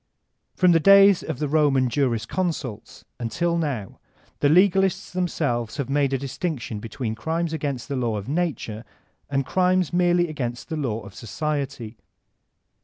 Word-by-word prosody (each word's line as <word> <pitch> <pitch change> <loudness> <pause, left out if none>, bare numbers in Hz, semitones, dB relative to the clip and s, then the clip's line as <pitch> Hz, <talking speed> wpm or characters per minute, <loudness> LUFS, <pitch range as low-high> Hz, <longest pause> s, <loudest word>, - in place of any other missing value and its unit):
From 180 -1 +4
the 165 - +5
days 195 +2 +7
of 160 - -5
the 150 +2 -1
Roman 140 -3 +3
jurisconsults 125 - -2 0.2
until 170 +9 -1
now 140 - -3 0.4
the - - +3
l^alists 190 +4 +3
themselves 140 -10 -2
have 140 -2 -3
made 140 -1 +2
a 135 - +1
distinction 135 -4 -4
between 115 +1 -4
crimes 160 +7 -2
against 140 -4 -3
the 140 - -3
law 120 -4 -1
of 100 - -6
nature 145 -8 -2 0.5
and 135 -1 0
crimes 185 -2 +1
merely 175 0 +3
against 125 -5 -5
the 160 - -2
law 120 -7 -2
of 100 - -12
society. 135 -3 -4
145 Hz, 145 wpm, -24 LUFS, 120-170 Hz, 0.5 s, days